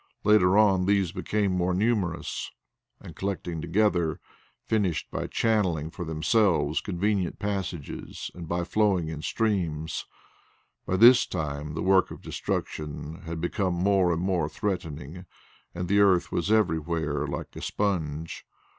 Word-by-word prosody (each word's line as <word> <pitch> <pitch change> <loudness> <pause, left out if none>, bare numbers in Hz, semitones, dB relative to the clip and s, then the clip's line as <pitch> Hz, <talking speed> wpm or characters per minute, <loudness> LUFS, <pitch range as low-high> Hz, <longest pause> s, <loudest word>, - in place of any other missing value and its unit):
Later 105 -2 +5
on 95 -4 +4
these 100 -4 +2
became 105 0 -1
more 90 0 0
numerous, 95 -6 -1 0.5
and - - -11
collecting 90 -4 -3
together, 90 -6 +1 0.5
finished 95 -8 0
by - - -3
channelling 90 -9 0
for 90 - -5
themselves 80 -1 +2
convenient 100 0 -1
passages 95 -7 -4
and 85 -2 -8
by 85 +2 -1
flowing 95 -4 +1
in 80 -2 -5
streams. 85 -8 -1 0.8
By 95 - +1
this 120 +4 +7
time 75 -3 -4
the 80 - -2
work 95 0 +4
of - - -10
destruction 75 +1 -4
had 80 0 -4
become 90 +2 -1
more 95 0 +3
and 85 +1 -1
more 90 -5 0
threatening 80 -1 -4 0.5
and 90 0 -3
the 100 +3 +3
earth 95 -3 +4
was 85 +5 -1
everywhere 80 -7 +1
like 70 - -6
a - - -7
sponge. 80 -6 -2
90 Hz, 135 wpm, -27 LUFS, 80-100 Hz, 0.8 s, this